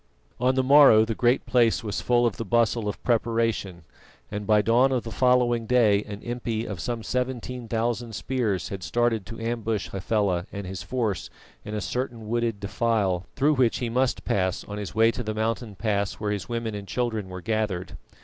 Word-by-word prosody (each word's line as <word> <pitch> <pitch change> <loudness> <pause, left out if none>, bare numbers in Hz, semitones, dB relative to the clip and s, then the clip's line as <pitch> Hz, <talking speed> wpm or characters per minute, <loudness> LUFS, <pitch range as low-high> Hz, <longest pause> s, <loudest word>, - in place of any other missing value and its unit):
On 130 +1 +2
the 130 - +2
morrow 135 -5 +7
the 115 - -2
Great 120 +3 +2
Place 120 0 +3
was 105 -2 -3
full 120 -1 +3
of 115 -5 0
the - - -3
bustle 115 0 +1
of 105 - -5
preparation, 115 -6 0 0.5
and 105 -1 -4
by 105 -1 +4
dawn 120 +5 +4
of 125 -3 0
the 115 - -7
following 125 -2 +2
day 110 -5 +4
an 105 0 -8
impi 120 -2 -3
of 100 -5 -5
some 120 +1 -3
seventeen 125 -1 -3
thousand 115 0 -2
spears 105 - -1
had 100 -1 -6
started 115 -1 0
to 115 - -8
ambush 115 -2 -2
Hafela 95 -2 0
and 100 -1 -6
his 95 0 -6
force 115 -8 -2 0.3
in 105 - -5
a 105 - -2
certain 120 -3 -4
wooded 115 -2 -1
defile 100 -3 0
through 145 +2 +3
which 130 -5 +2
he 120 - -2
must 125 +2 0
pass 95 -2 0
on 105 0 -6
his 105 -1 -6
way 115 +1 +5
to 125 - -5
the 110 -2 -4
mountain 110 0 -2
pass 100 -2 -1
where 105 -1 -3
his 100 0 -4
women 115 -2 -2
and 100 -1 -6
children 110 -5 -2
were 90 0 -7
gathered. 105 -4 -2
115 Hz, 195 wpm, -25 LUFS, 105-120 Hz, 0.5 s, morrow